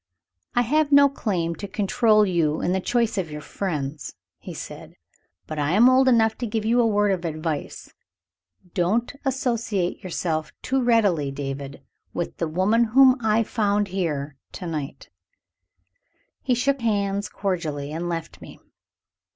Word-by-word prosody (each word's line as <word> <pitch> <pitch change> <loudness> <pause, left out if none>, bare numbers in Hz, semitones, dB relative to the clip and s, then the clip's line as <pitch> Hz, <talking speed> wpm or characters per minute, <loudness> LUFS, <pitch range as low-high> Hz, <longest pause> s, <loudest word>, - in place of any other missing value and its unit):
"I 245 - +4
have 295 +4 +1
no 280 0 +7
claim 185 -11 -2
to 200 - -6
control 215 +2 +3
you 165 -5 +1
in 175 - 0
the 190 - +1
choice 230 0 0
of 175 -4 -3
your 150 0 -6
friends," 150 -6 -4 0.2
he - - -9
said; - - -9 0.5
"but 155 -1 -5
I 145 +3 0
am 225 +5 +6
old 260 +1 +5
enough 225 -3 +4
to 245 - -2
give 215 0 -2
you 240 +2 +3
a 230 - +3
word 205 -1 +2
of 185 -2 -1
advice. 155 -2 -4 0.8
Don't 205 +8 0
associate 230 -8 -1
yourself 165 -3 -2
too 265 +1 0
readily, 205 - +2
David, 135 0 -6 0.3
with 175 - -3
the 165 - -1
woman 195 +9 +2
whom 255 +3 +6
I 220 0 +2
found 205 -2 0
here 150 -7 -3 0.2
to 185 - -7
night." 150 -5 -5 1.3
He 255 - +1
shook 275 +2 0
hands 200 -2 0
cordially, 155 -7 -3
and 170 +3 -3
left 165 -2 -5
me. - - -12
195 Hz, 150 wpm, -24 LUFS, 160-230 Hz, 1.3 s, no